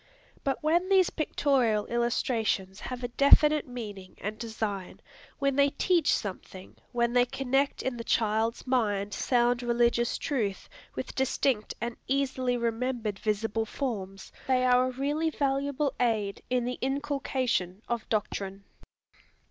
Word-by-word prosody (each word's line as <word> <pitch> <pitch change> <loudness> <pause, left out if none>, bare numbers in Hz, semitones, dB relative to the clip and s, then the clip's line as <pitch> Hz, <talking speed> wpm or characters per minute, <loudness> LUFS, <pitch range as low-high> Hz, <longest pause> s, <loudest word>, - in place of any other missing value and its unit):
But 275 0 -1
when 345 +4 +2
these 380 -2 +4
pictorial 255 -9 +1
illustrations 225 -5 0
have 250 -1 -6
a - - 0
definite 290 +4 +5
meaning 205 -7 -8
and 210 +1 -5
design, 215 -5 -4 0.4
when 275 -1 +1
they 280 0 +5
teach 340 +1 +2
something, 190 -1 -4 0.2
when 235 0 +1
they 245 0 +5
connect 270 +2 0
in 260 -2 -2
the 230 - -5
child's 225 +1 0
mind 205 -6 0
sound 240 -1 +2
religious 240 0 +2
truth 220 -10 -2 0.3
with - - -5
distinct 260 -3 0
and 235 0 -4
easily 260 -2 0
remembered 230 -2 -2
visible 220 +1 -1
forms, 195 -8 -4 0.2
they 255 -1 +3
are 250 0 +4
a - - -2
really 290 +5 0
valuable 280 -1 0
aid 215 -5 0
in 250 -1 +1
the 250 +1 -3
inculcation 265 -8 -1
of 235 -2 -3
doctrine. 200 -2 -2
245 Hz, 130 wpm, -29 LUFS, 215-270 Hz, 0.4 s, definite